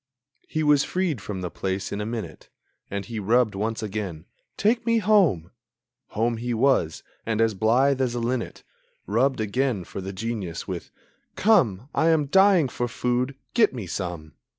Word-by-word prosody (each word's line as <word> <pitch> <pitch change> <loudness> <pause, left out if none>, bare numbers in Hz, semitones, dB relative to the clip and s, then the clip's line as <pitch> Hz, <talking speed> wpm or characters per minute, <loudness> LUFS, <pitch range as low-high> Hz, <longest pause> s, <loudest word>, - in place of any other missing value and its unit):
He 155 - -1
was 145 -1 +4
freed 180 - -1
from 95 -2 -5
the 90 - -4
place 95 0 -3
in 100 - -3
a 105 - -3
minute; 115 -1 -6 0.4
And 100 0 -4
he 115 -1 -5
rubbed 110 +2 +2
once 110 +3 -2
again: 95 -6 -4 0.3
"Take 225 +4 +2
me 230 -1 +2
home!" 185 - +3 0.7
Home 115 +1 +1
he 120 +1 -2
was. 115 - +2 0.2
And 110 -1 -2
as 115 -1 +3
blithe 125 +7 +2
as 125 -2 0
a - - -1
linnet 120 0 -3 0.4
Rubbed 125 +6 +1
again 110 -1 0
for 95 - -7
the 95 +1 -5
Genius 100 -4 -4
with: - - -5 0.5
"Come, 135 - +3
I 160 - +2
am 160 -3 +3
dying 190 0 +5
for 120 0 -3
food; 125 +3 -1 0.2
get 220 - +3
me 115 -6 -5
some!" 85 -4 -5
115 Hz, 170 wpm, -25 LUFS, 100-140 Hz, 0.7 s, dying